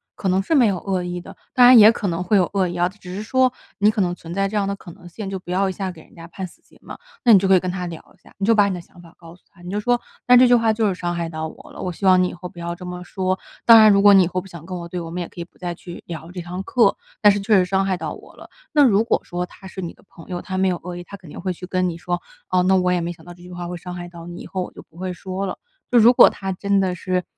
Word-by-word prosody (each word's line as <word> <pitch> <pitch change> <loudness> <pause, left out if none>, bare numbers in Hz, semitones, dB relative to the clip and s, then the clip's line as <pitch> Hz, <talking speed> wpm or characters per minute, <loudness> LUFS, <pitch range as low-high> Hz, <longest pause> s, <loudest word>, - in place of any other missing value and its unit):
可 195 - -2
能 185 +1 +2
是 320 +11 0
没 250 -6 +5
有 190 -3 -1
恶 190 -1 -2
意 175 0 -4
的。 175 - -12 0.2
当 250 -3 +7
然 250 0 +9
也 215 0 +9
可 230 -3 -3
能 175 0 -2
会 205 +3 +2
有 180 -3 +2
恶 190 -3 +1
意 175 - -6
啊， 175 - +3
只 185 -1 -10
是 200 - -4
说 255 +3 +2 0.3
你 205 +1 +5
可 215 - -4
能 175 -2 0
存 170 -1 -9
在 195 +1 0
这 205 - -6
样 205 -1 +1
的 200 - -2
可 190 - -13
能 175 - -15
性， 195 +3 -7
就 195 - -3
不 180 -1 -9
要 190 +1 +1
一 - - -4
下 190 -1 -4
给 165 -3 -14
人 - - -21
家 165 - -11
判 185 +2 -6
死 - - -21
刑 - - -24
嘛。 - - -10 0.3
那 235 - +8
你 - - +9
就 195 0 +1
可 190 - +7
以 - - +5
跟 185 - -4
他 180 0 -4
聊 165 -2 -7 0.2
一 - - -32
下， - - -19
你 195 - -2
就 225 +2 +4
把 205 -1 +4
你 - - -2
的 180 - -5
想 175 +1 -17
法 170 -1 -16
告 165 -1 -13
诉 180 - -27
他， 175 - -21
你 175 - -9
就 205 +2 -2
说： 245 +2 +1 0.2
“但 250 0 +7
这 255 - +7
句 245 - +6
话 230 -2 +3
就 220 0 +1
是 190 - -1
伤 175 -1 -3
害 170 -1 -3
到 160 -1 -5
我 - - -15
了， - - -9
我 180 - -3
希 185 +3 -6
望 185 -1 +6
你 180 - 0
以 - - -8
后 180 +1 -8
不 175 -1 -13
要 170 0 -4
这 180 +1 -10
么 180 0 -6
说。 185 0 -2 0.3
当 230 -1 +9
然 215 -1 +8
如 200 0 +4
果 205 0 +7
你 190 -1 +7
以 - - 0
后 185 +1 -2
不 190 - -10
想 170 -3 -11
跟 185 0 -6
我 170 -1 -7
对 175 +1 -5
我 165 -1 -7
们 180 +1 -4
也 175 - -4
可 175 - -10
以 - - -3
不 - - -29
再 175 -1 -5
去 175 0 -10
聊 165 0 -8
这 180 -1 -6
堂 180 +2 -6
课， 230 -1 +3 0.3
但 210 - +7
是 205 - 0
确 210 +2 +3
实 185 -2 +4
伤 190 +1 +1
害 190 -1 0
到 - - -5
我 - - -14
了。 - - -14 0.2
“那 295 -1 +5
如 220 -5 +4
果 230 - +1
说 175 0 -3
他 190 +2 -14
是 190 - -8
你 170 - -5
的 - - -24
朋 165 - -15
友， 175 -1 -4
他 190 -1 -5
没 190 0 +2
有 175 -1 -2
恶 180 0 -7
意， 175 - -7
他 200 +3 -10
肯 180 -5 -15
定 - - -9
会 185 +1 -2
去 180 +1 -8
跟 185 0 0
你 165 - -6
说： 175 0 -3 0.3
“哦， 180 0 +2
那 190 +1 +3
我 180 0 +1
也 175 - 0
没 170 +1 -3
想 165 -2 -13
到 175 - -10
这 175 0 -17
句 180 - -12
话 175 -1 -6
会 180 - -5
伤 180 +1 -8
害 175 0 -7
到 170 -1 -11
你， 175 0 -8
以 - - -9
后 185 -1 -3
我 - - -9
就 - - -12
不 160 - -26
会 185 +1 -4
说 185 +2 -5
了。 190 - -5 0.3
“就 245 - +6
如 230 +2 +7
果 - - +8
他 195 -1 -3
真 200 +2 0
的 185 -2 0
是， 180 +1 -2
185 Hz, 385 characters per minute, -21 LUFS, 175-200 Hz, 0.3 s, 然